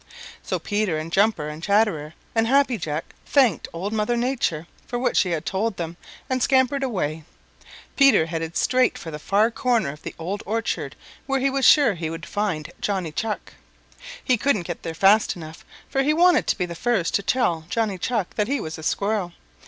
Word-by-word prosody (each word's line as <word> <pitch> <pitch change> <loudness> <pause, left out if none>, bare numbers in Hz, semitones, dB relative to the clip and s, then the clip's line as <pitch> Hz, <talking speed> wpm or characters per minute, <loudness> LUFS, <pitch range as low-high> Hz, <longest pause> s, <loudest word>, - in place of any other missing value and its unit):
So - - -2
Peter 205 -6 -1
and 155 +2 -5
Jumper 195 -5 +2
and 150 +1 -7
Chatterer 185 -6 +1 0.2
and 225 0 +2
Happy 265 -2 +3
Jack 155 +1 -4
thanked 260 - +3
Old 190 +6 -4
Mother 220 +2 0
Nature 235 - -1 0.2
for 245 - -3
what 250 +1 0
she 185 - +3
had 165 -2 -2
told 200 +2 -1
them 170 0 -4 0.3
and 260 -1 -1
scampered 265 +1 +3
away. 165 - -2 0.7
Peter 275 - +5
headed 165 0 -4
straight 255 0 +2
for 165 - -8
the 150 - -6
far 210 +8 +2
corner 235 - +1
of 150 +1 -13
the - - -7
Old 185 +5 -4
Orchard 225 +2 -2 0.3
where 270 0 +1
he 275 +1 +1
was 270 -1 +1
sure 280 -8 +6
he 165 -3 -4
would 165 -1 -6
find 200 -7 -2
Johnny 190 -6 -1
Chuck. 215 +6 -4 0.7
He 255 -3 +2
couldn't 220 -5 +1
get 175 -1 -5
there 165 -1 -5
fast 200 +6 +4
enough, 160 -2 -10 0.2
for 270 - 0
he 300 +3 +2
wanted 355 +2 +4
to - - +1
be 180 - 0
the 170 - -7
first 195 -1 0
to - - +2
tell 175 -8 0
Johnny 210 -3 -1
Chuck 215 -1 -1
that 210 -1 +1
he 280 +2 0
was 160 -5 -6
a - - -9
Squirrel. 200 0 -1
205 Hz, 195 wpm, -23 LUFS, 165-240 Hz, 0.7 s, sure